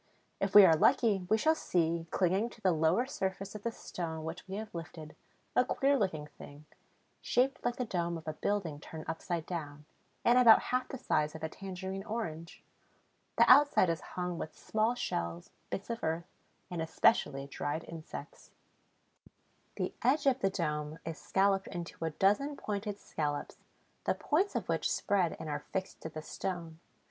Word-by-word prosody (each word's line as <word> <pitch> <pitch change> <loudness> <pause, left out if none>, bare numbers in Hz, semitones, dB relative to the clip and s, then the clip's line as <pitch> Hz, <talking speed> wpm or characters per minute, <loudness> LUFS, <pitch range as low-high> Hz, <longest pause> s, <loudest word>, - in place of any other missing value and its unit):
If 195 0 -1
we 205 -2 +12
are 165 - +7
lucky, 195 +3 +3
we 220 - +5
shall 315 +8 +4
see, 170 - 0
clinging 190 +7 +1
to 235 - -16
the 185 - +4
lower 160 +9 +2
surface 195 -5 -3
of 215 - -7
the 235 - -2
stone 160 -7 -5
which 160 +4 -6
we 190 - -5
have 215 +1 -6
lifted, 160 -2 -8 0.4
a 250 - +6
queer 275 +2 +2
looking 185 - 0
thing, 150 0 -13 0.6
shaped 260 +2 +1
like 240 0 0
the 250 - -2
dome 170 -5 -1
of 160 - -11
a 155 - -2
building 175 -8 -2
turned 160 0 -9
upside 165 0 -3
down, 150 -4 -6 0.4
and 240 +1 +6
about 235 -3 +9
half 255 0 +1
the 265 - -6
size 155 -10 0
of 160 - -8
a 160 - -1
tangerine 190 +1 -6
orange. 170 -8 -5 0.7
The - - +7
outside 280 -11 +6
is 165 - -3 0.2
hung 180 -1 -2
with 155 - -6
small 220 +3 0
shells, 85 - -3 0.2
bits 195 - -4
of 230 - -5
earth, 165 +2 -2 0.4
and, 175 -2 -2
especially, 150 -4 +2
dried 145 +3 -3
insects. 165 - -9 1.3
The - - -2
edge 280 +5 +2
of 265 -1 +4
the 195 - +2
dome 150 -4 -2
is 165 -1 -5
scalloped 195 0 +2
into 175 -2 -6
a - - +1
dozen 205 - +2
pointed 205 -3 -4
scallops, 145 -2 -3 0.5
the - - +2
points 365 +7 +1
of - - -2
which - - 0
spread 185 -5 +1
and 160 - -6
are 145 -1 -4
fixed 190 0 -3
to 160 - -5
the 155 0 -7
stone. 170 -3 -5
180 Hz, 175 wpm, -32 LUFS, 160-215 Hz, 1.3 s, we